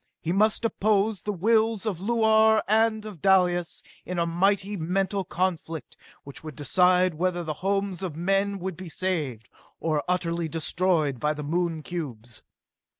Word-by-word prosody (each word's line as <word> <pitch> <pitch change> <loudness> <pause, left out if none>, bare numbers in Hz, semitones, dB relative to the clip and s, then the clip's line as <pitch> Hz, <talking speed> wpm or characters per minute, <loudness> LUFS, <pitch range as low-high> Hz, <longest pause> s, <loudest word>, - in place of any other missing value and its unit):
He 165 - -3
must 215 +4 +2
oppose 210 -2 +1
the 210 - -2
wills 220 +2 +1
of 200 -6 -2
Luar 220 +1 +3
and 220 +1 +2
of 200 -8 -9
Dalis 180 -2 +2 0.2
in 180 - -5
a 170 - +2
mighty 195 +4 +1
mental 190 +3 -1
conflict, 170 -3 -3 0.3
which 140 +2 -9
would 155 -3 -8
decide 180 +5 +3
whether 175 +2 -1
the 155 -2 -3
homes 195 -1 -1
of 180 -6 -4
men 195 +4 0
would 190 -1 -4
be 185 0 -9
saved, 150 -11 -2 0.3
or 155 -3 0
utterly 170 -2 -1
destroyed 160 -4 0
by 150 +3 +1
the 150 - -6
Moon 165 +1 -1
cubes. 120 -10 -6
180 Hz, 150 wpm, -26 LUFS, 165-200 Hz, 0.3 s, Luar